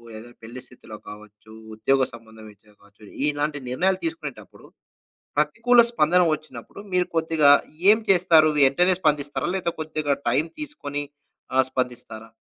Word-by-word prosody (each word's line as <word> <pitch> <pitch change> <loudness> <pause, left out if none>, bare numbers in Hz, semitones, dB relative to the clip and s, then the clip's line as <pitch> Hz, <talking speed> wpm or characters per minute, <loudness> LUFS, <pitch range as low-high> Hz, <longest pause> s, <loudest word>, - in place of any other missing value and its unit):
ఏదైనా 120 +2 -12
పెళ్లి 120 +3 -9
స్థితిలో 110 -3 -13
కావచ్చు, 105 +1 -14 0.2
ఉద్యోగ 135 +5 +1
సంబంధం 110 -1 -14
రీత్యా 105 +1 -25
కావచ్చు, 100 +1 -23 0.2
ఇలాంటి 145 0 -2
నిర్ణయాలు 185 +9 0
తీసుకునేటప్పుడు 330 0 -7 0.7
ప్రతికూల 245 +1 +3
స్పందన 180 -4 +2
వచ్చినప్పుడు 145 -1 -11
మీరు 180 -1 +1
కొద్దిగా 160 -3 +3 0.4
ఏం 220 - +5
చేస్తారు? 175 -4 +5
వెంటనే 160 +7 +4
స్పందిస్తారా? 150 -1 -1
లేతే 175 -3 -2
కొద్దిగా 155 -2 -2
టైం 135 +6 +1
తీసుకొని, 145 - -6 0.5
ఆహ్, 130 0 +4
స్పందిస్తారా? 125 -3 -5
145 Hz, 125 wpm, -23 LUFS, 115-175 Hz, 0.7 s, ఏం